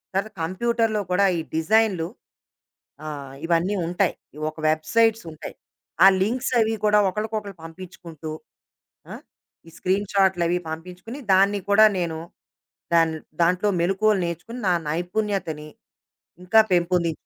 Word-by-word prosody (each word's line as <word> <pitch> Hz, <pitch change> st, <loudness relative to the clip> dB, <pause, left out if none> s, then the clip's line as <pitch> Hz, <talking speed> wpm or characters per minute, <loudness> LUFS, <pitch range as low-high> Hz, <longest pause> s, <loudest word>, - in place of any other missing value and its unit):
తర 195 Hz, +1 st, +1 dB, 0.2 s
కంప్యూటర్‌లో 225 Hz, +4 st, 0 dB
కూడా 200 Hz, +2 st, +4 dB
ఈ -, -, -2 dB, 0.2 s
డిజైనులు 185 Hz, -1 st, +2 dB, 1.0 s
ఆహ్, 140 Hz, -3 st, -7 dB
ఇవన్నీ 175 Hz, +4 st, +1 dB
ఉంటాయి. 180 Hz, +2 st, 0 dB, 0.4 s
ఒక 155 Hz, -, -24 dB
వెబ్‌సైట్సుంటాయి. 170 Hz, +2 st, 0 dB, 0.5 s
ఆ -, -, +10 dB, 0.2 s
లింక్సవి 230 Hz, 0 st, +1 dB
కూడా 210 Hz, 0 st, +5 dB
ఒకళ్ళకొకళ్ళు 210 Hz, -1 st, -4 dB
పంపించుకుంటూ 165 Hz, -2 st, -9 dB, 0.8 s
ఆ! -, -, -6 dB, 0.5 s
ఈ -, -, -13 dB
స్క్రీన్‌షాటులవి 190 Hz, -2 st, +1 dB
పంపించుకొని, 180 Hz, -, -8 dB
దాన్ని 200 Hz, +2 st, +4 dB
కూడా 215 Hz, +2 st, +7 dB
నేను, 165 Hz, -2 st, -2 dB, 0.8 s
దాని 165 Hz, -1 st, +3 dB, 0.3 s
దాంట్లో 180 Hz, +4 st, +2 dB
మెలుకువలు 195 Hz, +3 st, +2 dB
నేర్చుకొని 180 Hz, +9 st, -6 dB
నా -, -, +4 dB, 0.2 s
నైపుణ్యతని, 175 Hz, -2 st, -2 dB, 0.8 s
ఇంకా 220 Hz, +5 st, +5 dB
పెంపుంది 175 Hz, -1 st, +2 dB
185 Hz, 105 wpm, -23 LUFS, 165-210 Hz, 1.0 s, ఆ